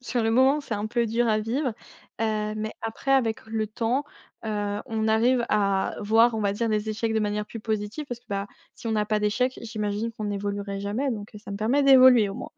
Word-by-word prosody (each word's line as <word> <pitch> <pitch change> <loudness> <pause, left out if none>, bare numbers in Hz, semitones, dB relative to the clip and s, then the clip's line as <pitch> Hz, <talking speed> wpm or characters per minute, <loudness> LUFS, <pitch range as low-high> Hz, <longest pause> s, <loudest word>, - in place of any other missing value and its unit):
sur 250 -2 -1
le 225 - +1
moment, 265 +5 +4
c'est 255 -6 -4
un 205 +1 -2
peu 235 +1 0
dur 230 +1 +1
à 215 0 +3
vivre, 245 +4 -1 0.5
heu, 215 -1 -1
mais 215 0 -3
après 225 +4 -4
avec 230 -5 +1
le 220 -1 -2
temps, 235 +5 -1 0.4
heu, 205 -1 -2
on 220 -2 -1
arrive, 235 +2 +3
à 200 -2 +1
voir 225 +3 +4
on 220 - -1
va 200 -1 +1
dire 230 +3 -1
les 215 0 -1
échecs 220 +1 -1
de 220 - +2
manière 210 0 -1
plus 225 - -8
positive. 215 +6 -3
Parce 245 -1 -5
que, 245 - -38
bah, 200 0 -2 0.3
si - - -10
on 220 -1 0
a 210 - +2
pas 215 0 0
d'échec 250 +5 0
j'imagine 215 0 -3
qu'on 215 -2 -4
évoluerait 200 0 -3
jamais, 220 +8 -1
donc 210 -3 -5 0.2
ça 205 - -8
me 200 - -4
permet 235 +8 +2
d'évoluer 255 -5 +7
au 195 - -6
moins. - - -7
220 Hz, 230 wpm, -26 LUFS, 210-240 Hz, 0.5 s, d'évoluer